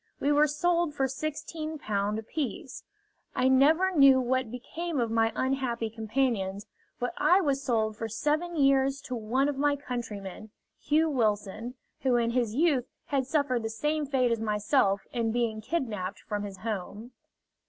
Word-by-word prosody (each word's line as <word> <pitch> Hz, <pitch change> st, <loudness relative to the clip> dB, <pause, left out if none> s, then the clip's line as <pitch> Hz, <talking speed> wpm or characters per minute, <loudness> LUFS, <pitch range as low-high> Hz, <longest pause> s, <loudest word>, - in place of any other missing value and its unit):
We 285 Hz, -, +1 dB
were 295 Hz, +1 st, +5 dB
sold 335 Hz, +1 st, +1 dB
for 270 Hz, -, +1 dB
Ł16 285 Hz, -7 st, -3 dB
apiece. 260 Hz, +6 st, -5 dB, 0.5 s
I 255 Hz, -, +2 dB
never 310 Hz, +8 st, +4 dB
knew 275 Hz, -3 st, +7 dB
what 255 Hz, -1 st, 0 dB
became 310 Hz, +6 st, -4 dB
of 230 Hz, -2 st, 0 dB
my 225 Hz, 0 st, +2 dB
unhappy 255 Hz, -4 st, -1 dB
companions, 220 Hz, -3 st, -1 dB, 0.3 s
but 245 Hz, -, -2 dB
I 365 Hz, -, +5 dB
was 280 Hz, -7 st, 0 dB
sold 220 Hz, -5 st, 0 dB
for 225 Hz, 0 st, -4 dB
seven 305 Hz, +9 st, -1 dB
years 275 Hz, -1 st, +3 dB
to 255 Hz, -, -5 dB
one 240 Hz, +5 st, 0 dB
of 290 Hz, -2 st, -2 dB
my 290 Hz, 0 st, +3 dB
countrymen, 220 Hz, -7 st, -6 dB, 0.3 s
Hugh 310 Hz, +2 st, +2 dB
Wilson, 220 Hz, -1 st, -1 dB, 0.2 s
who 260 Hz, -2 st, +2 dB
in 235 Hz, -1 st, +2 dB
his 235 Hz, -3 st, 0 dB
youth 285 Hz, -5 st, +2 dB, 0.2 s
had 270 Hz, -3 st, 0 dB
suffered 275 Hz, -5 st, +1 dB
the 225 Hz, -, -3 dB
same 295 Hz, +6 st, -1 dB
fate 255 Hz, -3 st, +2 dB
as 230 Hz, -, 0 dB
myself 210 Hz, -1 st, +1 dB
in 230 Hz, -2 st, 0 dB
being 225 Hz, -2 st, -1 dB
kidnapped 215 Hz, -, -3 dB
from 205 Hz, -1 st, -4 dB
his 195 Hz, -2 st, -8 dB
home. 215 Hz, +2 st, -5 dB
250 Hz, 155 wpm, -28 LUFS, 220-285 Hz, 0.5 s, knew